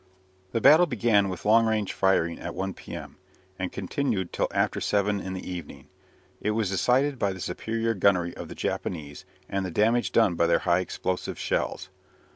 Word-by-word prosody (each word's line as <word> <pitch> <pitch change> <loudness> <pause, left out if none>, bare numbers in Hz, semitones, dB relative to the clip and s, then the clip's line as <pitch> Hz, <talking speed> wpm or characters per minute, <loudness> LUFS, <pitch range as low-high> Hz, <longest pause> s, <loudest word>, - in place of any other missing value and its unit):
The 115 - -1
battle 155 +5 +7
began 110 -5 +2
with 90 +1 -6
long 115 +2 +5
range 110 -3 0
firing 95 -3 +1
at 85 - -6
1 95 +1 -3
p.m., - - -9 0.4
and 90 -1 -2
continued 95 -1 -2
till - - 0
after - - 0
seven 100 0 +1
in 95 - -5
the 95 - -6
evening. 85 -6 -8 0.5
It - - 0
was 105 -4 0
decided 130 +7 +2
by 100 -1 +1
the 95 - -9
superior 115 +6 -2
gunnery 90 -3 +2
of - - -7
the - - -9
Japanese, 75 -5 -4 0.2
and 100 0 -2
the 95 - -3
damage 115 +7 +2
done 110 -6 +4
by 85 0 +2
their 85 0 +4
high 90 -1 +4
explosive 95 0 -3
shells. - - -2
95 Hz, 180 wpm, -26 LUFS, 90-115 Hz, 0.5 s, battle